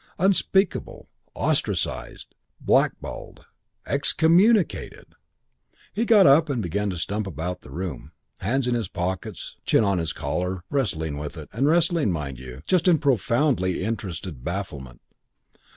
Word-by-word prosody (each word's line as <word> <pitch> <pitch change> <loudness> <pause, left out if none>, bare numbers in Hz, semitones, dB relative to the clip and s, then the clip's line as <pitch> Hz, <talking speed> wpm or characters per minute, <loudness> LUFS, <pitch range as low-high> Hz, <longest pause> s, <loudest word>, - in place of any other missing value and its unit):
Unspeakable. 190 +1 +1 0.3
Ostracized. - - -2 0.3
Blackballed. - - -1 0.4
Excommunicated.' 170 +8 +2 0.8
He 230 - 0
got 220 -4 +6
up 150 +3 +6
and 135 -4 -1
began 100 +2 -1
to 90 - -4
stump 100 +5 -2
about 90 +1 -4
the - - -14
room, 90 -1 -6 0.3
hands 125 +6 0
in 125 - +1
his 115 -2 -1
pockets, 90 +1 -5
chin - - +3
on 100 -3 +1
his 80 -1 -2
collar, 90 +2 -3
wrestling 80 - -1
with 75 +3 -6
it, 75 - -9
and 130 +6 +1
wrestling, 165 - +3
mind 70 -6 -4
you, 65 +2 -10
just 185 -1 +2
in 175 -3 +6
profoundly 120 - +1
interested 95 - -5
bafflement. 75 -8 -5
100 Hz, 130 wpm, -24 LUFS, -, 0.8 s, got